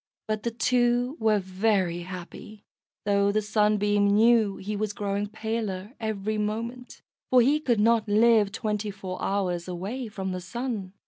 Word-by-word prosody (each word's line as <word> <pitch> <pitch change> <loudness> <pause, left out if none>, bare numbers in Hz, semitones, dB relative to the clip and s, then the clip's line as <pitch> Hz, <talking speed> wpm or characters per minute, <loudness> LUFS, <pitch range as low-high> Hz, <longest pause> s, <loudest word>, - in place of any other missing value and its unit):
But 215 -1 -1
the 235 - -1
two 245 +2 +1
were 220 -1 +3
very 190 -2 0
happy, 185 +4 -9 0.4
though 200 0 +3
the 215 - +2
Sunbeam 205 -1 +2
knew 215 0 +4
he 210 +2 -4
was 210 0 -2
growing 205 0 -2
paler 215 -1 -4
every 215 -1 -2
moment, 230 +4 -4 0.3
for 255 - +6
he 280 +5 +4
could 240 -7 +1
not 225 0 +3
live 215 -1 +4
twenty 210 0 -2
four 190 -2 -6
hours 180 -3 -1
away 200 +8 -4
from 190 -3 -4
the 185 0 -4
Sun. 210 -1 -4
210 Hz, 150 wpm, -26 LUFS, 195-225 Hz, 0.4 s, for